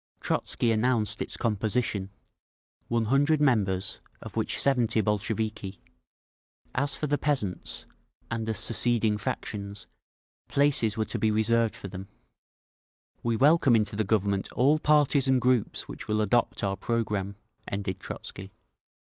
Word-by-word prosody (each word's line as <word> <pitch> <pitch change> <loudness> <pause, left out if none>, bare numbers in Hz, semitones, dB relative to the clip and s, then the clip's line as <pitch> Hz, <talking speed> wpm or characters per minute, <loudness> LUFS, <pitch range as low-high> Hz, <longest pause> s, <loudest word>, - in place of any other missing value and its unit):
Trotzky 120 - 0
announced 110 -1 +1
its - - -4
composition: 105 -2 0 0.8
100 135 +7 +2
members, 100 -9 +1 0.2
of - - -10
which - - 0
70 125 -5 +2
Bolsheviki…. 105 -2 -2 0.9
As 140 +2 +1
for - - -2
the 145 0 0
peasants, 130 -11 -2 0.5
and 115 -1 -2
the 110 - -1
seceding 115 -2 +2
factions, 100 0 -5 0.6
places 135 -7 +1
were 110 - 0
to - - -4
be 110 - +2
reserved 110 +1 +2
for - - -8
them. 95 0 -8 1.1
"We 115 -1 0
welcome 140 0 +5
into 105 -2 +1
the 110 - +1
Government 100 -1 0
all 145 +5 +3
parties 150 -2 +3
and 130 -1 +4
groups 125 -3 0
which - - -8
will 110 0 +1
adopt 115 +2 +1
our 95 -1 0
programme," 105 -2 -2 0.3
ended 100 -1 -3
Trotzky. 95 +1 -8
110 Hz, 130 wpm, -27 LUFS, 100-125 Hz, 1.1 s, welcome